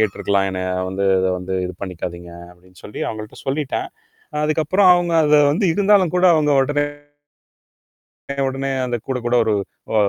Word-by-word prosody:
கேட்டுருக்கலாம். 100 Hz, -2 st, 0 dB
என்னை 95 Hz, 0 st, -4 dB, 0.2 s
வந்து 95 Hz, +1 st, -2 dB
இத 95 Hz, -, +1 dB
வந்து 95 Hz, +1 st, -5 dB
இது 90 Hz, -, -7 dB
பண்ணிக்காதீங்க." 85 Hz, -1 st, -6 dB, 0.2 s
அப்படின்னு 90 Hz, 0 st, -21 dB
சொல்லி 105 Hz, -, -8 dB
அவுங்கள்ட்ட 110 Hz, -1 st, -8 dB
சொல்லிட்டேன். 140 Hz, 0 st, -2 dB, 0.6 s
அதுக்கப்புறம் 160 Hz, +5 st, +2 dB
அவுங்க 175 Hz, -1 st, 0 dB
அத 150 Hz, 0 st, +4 dB, 0.2 s
வந்து, 190 Hz, +7 st, 0 dB
இருந்தாலும் 200 Hz, -4 st, +3 dB
கூட 180 Hz, -, +2 dB
அவுங்க 150 Hz, -1 st, +2 dB
உடனே 145 Hz, +2 st, 0 dB, 1.6 s
உடனே 135 Hz, +1 st, -3 dB, 0.2 s
அத 120 Hz, -1 st, -2 dB
கூடக் 125 Hz, -3 st, -3 dB
கூட 120 Hz, +1 st, +2 dB
ஒரு 110 Hz, -, +1 dB, 0.4 s
அ -, -, -2 dB
125 Hz, 150 wpm, -20 LUFS, 95-155 Hz, 1.6 s, அத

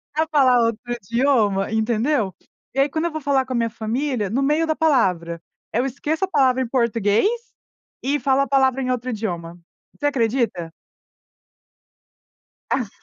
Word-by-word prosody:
a 315 Hz, +1 st, +1 dB
falar 260 Hz, -4 st, +5 dB
outro 230 Hz, -1 st, 0 dB
idioma, 225 Hz, -3 st, +1 dB
entendeu? 220 Hz, -1 st, +1 dB, 0.4 s
E 270 Hz, -, 0 dB
aí, 275 Hz, -, +4 dB
quando 320 Hz, +4 st, -2 dB
eu 340 Hz, -, -1 dB
vou 315 Hz, -, -4 dB
falar 275 Hz, -3 st, +1 dB
com 255 Hz, -, -3 dB
a -, -, -1 dB
minha 230 Hz, -1 st, +1 dB
família, 230 Hz, 0 st, -2 dB
no 265 Hz, +6 st, 0 dB
meio 305 Hz, +3 st, +2 dB
da 315 Hz, -, +1 dB
palavra, 180 Hz, -, +1 dB, 0.3 s
eu 245 Hz, +4 st, +1 dB
esqueço 300 Hz, +7 st, -2 dB
a -, -, -15 dB
palavra 260 Hz, -7 st, +2 dB
em 255 Hz, -, -1 dB
português 230 Hz, -, +2 dB, 0.8 s
e 285 Hz, +3 st, 0 dB
falo 275 Hz, -1 st, +2 dB
a 275 Hz, -, 0 dB
palavra 265 Hz, -1 st, +2 dB
em 255 Hz, -, -1 dB
outro 250 Hz, 0 st, -2 dB
idioma. 175 Hz, -6 st, -4 dB, 0.4 s
Você 290 Hz, -, -4 dB
acredita? 230 Hz, -, 0 dB, 2.0 s
Ah. 245 Hz, -6 st, 0 dB
250 Hz, 160 wpm, -22 LUFS, 220-275 Hz, 2.0 s, falar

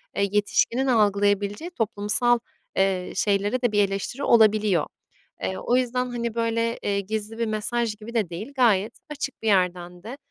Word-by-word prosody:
Eee, 200 Hz, 0 st, +1 dB
yetişkinin 230 Hz, +5 st, +1 dB
algılayabileceği 205 Hz, -, +1 dB
toplumsal, 235 Hz, -, +1 dB, 0.4 s
eee, 190 Hz, -1 st, +1 dB
şeylere 205 Hz, +4 st, +1 dB
de 245 Hz, -3 st, +1 dB
bir 205 Hz, -1 st, +4 dB
eleştiri 200 Hz, +8 st, -4 dB
olabiliyor. 215 Hz, -, +4 dB, 0.6 s
Eee, 95 Hz, 0 st, -2 dB
o 245 Hz, -, +1 dB
yüzden, 250 Hz, 0 st, 0 dB
hani, 235 Hz, -2 st, -3 dB
böyle, 230 Hz, 0 st, 0 dB
eee, 200 Hz, -1 st, 0 dB
gizli 215 Hz, +2 st, -4 dB
bir 230 Hz, -, 0 dB
mesaj 220 Hz, +1 st, -1 dB
gibi 215 Hz, +2 st, -10 dB
de 215 Hz, -7 st, 0 dB
değil, 205 Hz, +11 st, -7 dB
gayet 225 Hz, -4 st, +2 dB
açık 290 Hz, -2 st, -5 dB
bir 225 Hz, -, -3 dB
yerden 180 Hz, -3 st, 0 dB
de, 240 Hz, +6 st, -7 dB
215 Hz, 155 wpm, -24 LUFS, 200-235 Hz, 0.6 s, bir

